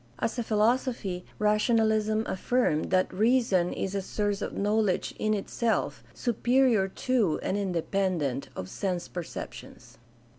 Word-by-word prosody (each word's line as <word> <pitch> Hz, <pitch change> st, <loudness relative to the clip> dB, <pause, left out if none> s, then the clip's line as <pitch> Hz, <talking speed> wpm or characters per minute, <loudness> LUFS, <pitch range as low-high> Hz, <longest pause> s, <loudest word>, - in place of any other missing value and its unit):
As 235 Hz, -, -2 dB
a -, -, +2 dB
philosophy, 220 Hz, -4 st, 0 dB
rationalism 215 Hz, 0 st, +2 dB
affirmed 190 Hz, -5 st, 0 dB
that 185 Hz, 0 st, +2 dB
"reason 215 Hz, -4 st, +2 dB
is 195 Hz, -, -3 dB
a 200 Hz, -, -1 dB
source 205 Hz, +1 st, -2 dB
of -, -, -4 dB
knowledge 210 Hz, -2 st, +1 dB
in 215 Hz, 0 st, +1 dB
itself, 225 Hz, +3 st, -1 dB
superior 240 Hz, -3 st, +2 dB
to 215 Hz, -4 st, 0 dB
and -, -, -1 dB
independent 180 Hz, -7 st, -1 dB
of 95 Hz, -, -5 dB
sense 180 Hz, -, -3 dB
perceptions." 175 Hz, -2 st, -8 dB
210 Hz, 120 wpm, -28 LUFS, 185-225 Hz, -, a